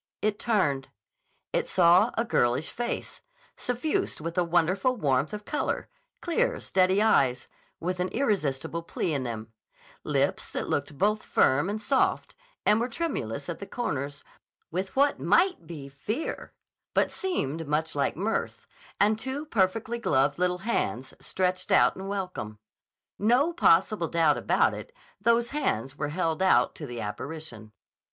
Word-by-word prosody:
It 210 -1 0
turned. 145 - +1 0.7
It - - 0
saw 180 +4 +5
a 230 - +1
girlish 125 - +1
face, 240 0 -4 0.3
suffused 305 +10 -1
with 165 +2 -5
a 180 - +3
wonderful 180 +8 +2
warmth 140 - +1
of 210 0 -6
color, 300 - -2 0.3
clear, 460 +9 +1
steady 190 +2 +2
eyes, 130 - +3 0.3
with 180 +2 -3
an 180 - +1
irresistible 170 - -1
plea 170 0 -2
in 140 - 0
them; 115 -3 -5 0.5
lips - - 0
that - - -3
looked 145 0 -2
both 210 +4 +2
firm 145 +8 +2
and 210 +1 -2
soft 260 +5 +1 0.3
and 210 - +5
were 240 +2 -1
tremulous 150 - -3
at 170 - -5
the 200 - -7
comers 145 - -3 0.5
with 185 +3 -3
what 280 +1 +3
might 365 +1 +2
be 150 -5 -7
fear, 205 - -4 0.4
but - - +3
seemed 165 - -2
much 155 +2 0
like 145 +1 0
mirth, 210 +5 -2 0.3
and 215 +1 +3
two 265 +5 -4
perfectly 225 0 0
gloved 140 -7 +2
little 180 0 +1
hands 130 - -1
stretched 185 -1 -1
out - - +5
in 190 +1 -7
welcome. 185 - -4 0.6
No 250 +10 +3
possible 190 - +3
doubt 165 0 +3
about - - +2
it; - - -8 0.3
those 235 +2 +2
hands 135 - -1
were 145 0 -3
held 165 +1 -1
out 190 - +4
to 150 - -7
the 120 -1 -6
apparition. 110 0 -7
185 Hz, 145 wpm, -27 LUFS, 145-225 Hz, 0.7 s, saw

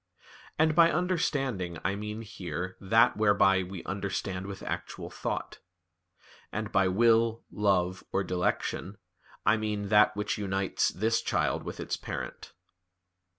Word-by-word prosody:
And 155 0 +4
by 165 +1 +6
understanding 135 - -1
I 95 - +1
mean 105 +2 -5
here 90 -4 -5
that 110 +4 +4
whereby 100 -3 +4
we 95 -1 -7
understand 95 -1 -3
with 100 -1 -7
actual 85 0 -5
thought; - - -4 0.9
and 110 0 -3
by 95 -1 +3
will, 115 +3 +3
love, 95 -3 +1
or 100 - +1
dilection 90 +2 -2 0.5
I 110 - +5
mean 105 -2 -2
that 105 0 +5
which 105 +1 -2
unites 95 -1 0
this 110 +4 0
child - - 0
with - - -7
its - - -2
parent." - - -6
100 Hz, 130 wpm, -29 LUFS, 95-110 Hz, 0.9 s, by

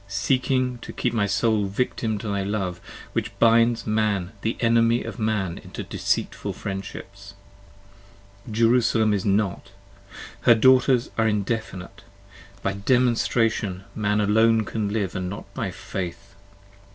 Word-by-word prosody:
Seeking 125 +5 0
to - - -8
keep 120 - -2
my 105 -3 +1
soul 105 +1 +1
a - - -2
victim 110 +1 -1
to 105 - -6
thy 100 -1 -1
Love! 95 -3 -3 0.3
which - - -3
binds 115 0 +4
25 - - -13
Man 100 -4 0
the 110 - -2
enemy 115 0 +3
of - - -7
man 105 -5 -1
into - - -8
deceitful - - -2
friendships: 100 0 -7 1.1
Jerusalem 115 -1 +3
is 100 -2 -1
not! 100 -1 0 0.7
her 120 - +6
daughters 130 +1 +4
are 110 - +3
indefinite; 105 -3 -3 0.6
By 100 - 0
demonstration 115 -3 +1
man 105 -1 0
alone 110 +2 +3
can 110 -2 -2
live, 100 -3 -2
and 90 -1 -2
not 100 - -7
by - - -3
faith. 95 +1 -6
110 Hz, 135 wpm, -24 LUFS, 100-115 Hz, 1.1 s, her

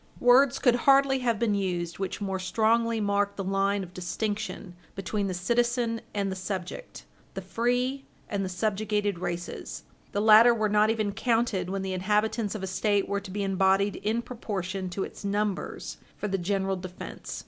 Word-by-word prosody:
Words 260 +2 +5
could 245 - +4
hardly 270 +2 +4
have 235 -3 +1
been 220 -1 +1
used 175 -3 -2
which 195 -2 -3
more 195 -1 -2
strongly 225 +4 +1
mark 200 -1 +1
the 195 - -3
line 195 +1 +1
of 180 -1 -11
distinction 200 +1 -4 0.2
between 195 +2 -2
the 185 - -2
citizen 235 +4 0
and 200 -2 -1
the - - -3
subject 190 - -6 0.3
the - - -3
free 250 +3 -1 0.2
and 200 -4 -2
the 190 - -3
subjugated 205 0 -1
races. 175 -1 -5 0.3
The 205 - -1
latter 220 +3 +7
were 215 -2 +1
not 210 +1 +4
even 215 -2 0
counted 225 -4 0
when 195 0 -2
the 190 -1 -3
inhabitants 210 +3 0
of 200 - -5
a - - 0
State 200 +1 +1
were 200 0 -1
to 195 - -10
be 200 +2 -3
embodied 195 +1 +2
in 220 +4 -1
proportion 195 -6 -4
to 190 +2 -3
its - - -8
numbers 205 0 -2 0.2
for 210 - -3
the 195 -1 -1
general 195 +1 0
defence. 180 0 -7
205 Hz, 175 wpm, -27 LUFS, 190-225 Hz, 0.3 s, latter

